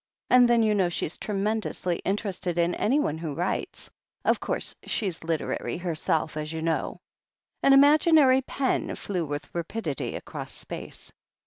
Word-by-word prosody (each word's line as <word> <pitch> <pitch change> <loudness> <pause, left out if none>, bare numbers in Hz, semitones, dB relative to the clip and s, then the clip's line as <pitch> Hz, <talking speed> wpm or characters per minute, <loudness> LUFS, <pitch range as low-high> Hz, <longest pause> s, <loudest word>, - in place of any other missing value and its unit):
And 250 -1 +7
then 235 -1 +4
you 215 -1 +3
know 190 -4 +2
she's 170 -1 -2
tremendously 205 -3 -1
interested 190 -3 -2
in 170 +1 +2
anyone 225 - +1
who 160 -4 -4
writes 175 +4 -3 0.2
— - - -49
of - - +3
course, - - -3
she's 190 -7 -2
literary 160 0 -2
herself, 160 -3 -1
as 155 0 -3
you 160 0 -4
know." 165 -1 -1 0.6
An 275 - +5
imaginary 285 -1 +6
pen 265 0 -1
flew 185 -4 -3
with 145 0 -5
rapidity 170 - -3
across - - -6
space. - - -8
185 Hz, 145 wpm, -27 LUFS, 165-235 Hz, 0.6 s, And